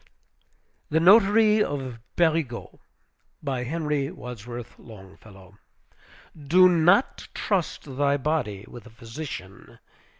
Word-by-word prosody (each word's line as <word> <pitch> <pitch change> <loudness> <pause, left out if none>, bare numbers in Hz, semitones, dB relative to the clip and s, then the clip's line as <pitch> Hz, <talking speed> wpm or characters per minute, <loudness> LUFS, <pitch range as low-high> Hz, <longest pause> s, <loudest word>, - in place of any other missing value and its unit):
THE 160 - +2
NOTARY 210 +3 +5
OF 130 -5 -5 0.2
PÉRIGUEUX 160 -7 -1 0.6
BY 130 -3 -2
HENRY 150 0 -2
WADSWORTH 120 0 -9
LONGFELLOW 95 -2 -15 0.9
Do 185 +5 +6
not 175 +6 +2
trust 190 -5 -2
thy 140 0 +2
body 130 -9 -2
with 120 0 -12
a - - -13
physician. 115 -4 -9
140 Hz, 95 wpm, -25 LUFS, 115-165 Hz, 0.9 s, Do